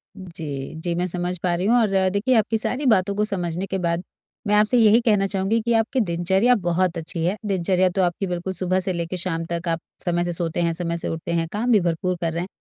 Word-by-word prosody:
जी, 160 Hz, -7 st, -7 dB
जी, 175 Hz, +1 st, -1 dB
मैं 180 Hz, -, 0 dB
समझ 180 Hz, 0 st, -3 dB
पा 180 Hz, -1 st, +1 dB
रही 180 Hz, +2 st, -2 dB
हूँ 235 Hz, -, +4 dB
और 195 Hz, -4 st, +2 dB
देखिए 215 Hz, +6 st, +1 dB
आपकी 225 Hz, 0 st, +2 dB
सारी 255 Hz, +6 st, -2 dB
बातों 200 Hz, -4 st, +3 dB
को 210 Hz, +1 st, +1 dB
समझने 180 Hz, -3 st, -3 dB
के 195 Hz, -, -2 dB
बाद, 170 Hz, -1 st, -1 dB, 0.4 s
मैं 210 Hz, -, +3 dB
आपसे 210 Hz, +4 st, +4 dB
यही 225 Hz, 0 st, +6 dB
कहना 210 Hz, -4 st, +2 dB
चाहूँगी 195 Hz, +3 st, 0 dB
कि 235 Hz, +1 st, 0 dB
आपकी 225 Hz, +3 st, +1 dB
दिनचर्या 190 Hz, +5 st, +2 dB
बहुत 175 Hz, -3 st, 0 dB
अच्छी 165 Hz, 0 st, -4 dB
है, 185 Hz, +4 st, +1 dB
दिनचर्या 185 Hz, -1 st, +2 dB
तो 195 Hz, -, +2 dB
आपकी 180 Hz, +2 st, 0 dB
बिल्कुल 180 Hz, +1 st, -3 dB
सुबह 185 Hz, +1 st, 0 dB
से 190 Hz, 0 st, -2 dB
लेकर 170 Hz, +1 st, -3 dB
शाम 165 Hz, -2 st, -3 dB
तक 170 Hz, +1 st, -3 dB
आप 165 Hz, 0 st, 0 dB, 0.3 s
समय 175 Hz, -1 st, +1 dB
से 175 Hz, 0 st, -2 dB
सोते 165 Hz, 0 st, -2 dB
हैं, 170 Hz, -1 st, +1 dB
समय 170 Hz, 0 st, -2 dB
से -, -, -4 dB
उठते 165 Hz, +1 st, -4 dB
हैं, 165 Hz, -1 st, 0 dB
काम 235 Hz, +4 st, 0 dB
भी 215 Hz, -, +6 dB
भरपूर 175 Hz, +1 st, -1 dB
कर 165 Hz, -1 st, -1 dB
रहे 170 Hz, -, -2 dB
हैं। 180 Hz, -, -4 dB
185 Hz, 245 wpm, -23 LUFS, 170-205 Hz, 0.4 s, यही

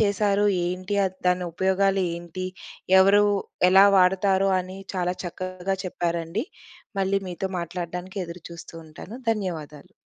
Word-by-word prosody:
చేశారు 205 Hz, -1 st, +2 dB, 0.2 s
ఏంటి? 185 Hz, +3 st, -2 dB
అద్ 185 Hz, -1 st, -3 dB
దానుపయోగాలు 190 Hz, +2 st, +1 dB
ఏంటి? 170 Hz, +2 st, -6 dB, 0.5 s
ఎవరు 200 Hz, +2 st, +6 dB, 0.5 s
ఎలా 190 Hz, +1 st, +8 dB
వాడతారు? 190 Hz, +1 st, +3 dB
అని 185 Hz, +1 st, -8 dB, 0.2 s
చాలా 180 Hz, -1 st, 0 dB
చక్కగా 185 Hz, +2 st, -4 dB
చెప్పారండి. 170 Hz, +3 st, -2 dB, 0.6 s
మళ్ళీ 195 Hz, +1 st, +1 dB
మీతో 180 Hz, +2 st, -3 dB
మాట్లాడడానికి 180 Hz, +2 st, -5 dB
ఎదురుచూస్తూ 170 Hz, -1 st, -10 dB
ఉంటాను. 170 Hz, +8 st, -10 dB
ధన్యవాదాలు. 175 Hz, -5 st, -4 dB
185 Hz, 105 wpm, -25 LUFS, 175-195 Hz, 0.6 s, ఎలా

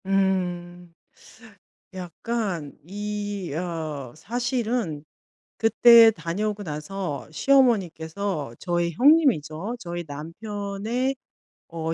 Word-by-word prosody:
음. 180 Hz, -3 st, -1 dB, 1.0 s
약간 185 Hz, -3 st, -4 dB
이 205 Hz, -1 st, -4 dB
어 155 Hz, -7 st, -4 dB
사실은 235 Hz, -, -2 dB, 0.5 s
그때 230 Hz, 0 st, +7 dB
다녀오고 205 Hz, +4 st, -3 dB
나서 150 Hz, -1 st, -5 dB
시어머니께서 185 Hz, -, +1 dB
저희 175 Hz, -1 st, 0 dB
형님이죠. 230 Hz, -, +3 dB
저희 175 Hz, -4 st, -5 dB
남편의 205 Hz, -, -3 dB, 0.5 s
어 165 Hz, -1 st, -3 dB
190 Hz, 170 characters per minute, -25 LUFS, 165-220 Hz, 1.0 s, 그때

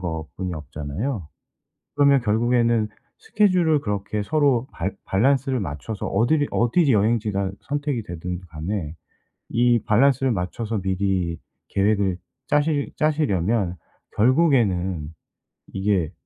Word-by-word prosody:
것뿐이 85 Hz, +1 st, -4 dB
없잖아요. 75 Hz, -, -5 dB, 0.7 s
그러면 140 Hz, -1 st, +5 dB
결국에는 115 Hz, 0 st, +2 dB, 0.3 s
스케줄을 185 Hz, -, +2 dB
그렇게 105 Hz, -2 st, -2 dB
서로 140 Hz, -5 st, +2 dB
밸 95 Hz, +4 st, -2 dB
밸런스를 130 Hz, +5 st, +2 dB
맞춰서 95 Hz, +6 st, -5 dB
어디를 140 Hz, +9 st, +2 dB
어디 135 Hz, +5 st, +3 dB
여행지가 105 Hz, -2 st, +1 dB
선택이 145 Hz, -4 st, -2 dB
되든 90 Hz, 0 st, -5 dB
간에 80 Hz, +1 st, -4 dB, 0.6 s
이 120 Hz, 0 st, +3 dB
밸런스를 135 Hz, +3 st, +3 dB
맞춰서 105 Hz, +3 st, -3 dB
미리 95 Hz, -3 st, -1 dB, 0.3 s
계획을 100 Hz, -2 st, +1 dB, 0.3 s
짜실 145 Hz, -1 st, +1 dB
짜시려면 110 Hz, -, +1 dB, 0.4 s
결국에는 105 Hz, -, +2 dB, 0.6 s
이게 95 Hz, -5 st, 0 dB
105 Hz, 265 characters per minute, -23 LUFS, 95-135 Hz, 0.7 s, 그러면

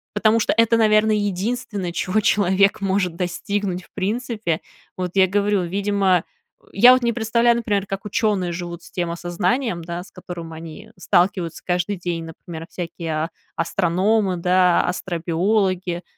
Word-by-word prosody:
потому 215 Hz, +2 st, +3 dB
что 215 Hz, -, +1 dB
это, 230 Hz, 0 st, +4 dB
наверное, 215 Hz, -1 st, +4 dB
единственное, 205 Hz, -1 st, -2 dB
чего 185 Hz, +4 st, 0 dB
человек 200 Hz, 0 st, +3 dB
может 190 Hz, -3 st, 0 dB
достигнуть 185 Hz, +1 st, -2 dB
в -, -, -22 dB
принципе. 215 Hz, -4 st, -2 dB, 0.4 s
Вот 180 Hz, -1 st, -3 dB
я 190 Hz, -1 st, +5 dB
говорю, 205 Hz, 0 st, +1 dB
видимо, 195 Hz, +1 st, +1 dB, 0.4 s
э, -, -, -24 dB
я 245 Hz, +5 st, +8 dB
вот 255 Hz, -, +2 dB
не 235 Hz, 0 st, +1 dB
представляю, 235 Hz, +1 st, +2 dB
например, 205 Hz, -4 st, -1 dB
как 195 Hz, +1 st, -5 dB
ученые 205 Hz, -4 st, 0 dB
живут 175 Hz, 0 st, -6 dB
с -, -, -15 dB
тем 175 Hz, -2 st, -2 dB
осознанием, 175 Hz, +4 st, -1 dB
да, 170 Hz, +1 st, -5 dB
с -, -, -17 dB
которым 175 Hz, -3 st, -8 dB
они 160 Hz, -1 st, -10 dB
сталкиваются 180 Hz, -2 st, +1 dB
каждый 180 Hz, +3 st, 0 dB
день, 170 Hz, -2 st, -3 dB
например, 165 Hz, 0 st, -9 dB
всякие 170 Hz, -1 st, -6 dB, 0.2 s
а -, -, -8 dB, 0.3 s
астрономы, 185 Hz, +3 st, +1 dB
да, 180 Hz, 0 st, +3 dB
астробиологи, 180 Hz, +1 st, -1 dB
190 Hz, 150 wpm, -21 LUFS, 175-210 Hz, 0.4 s, я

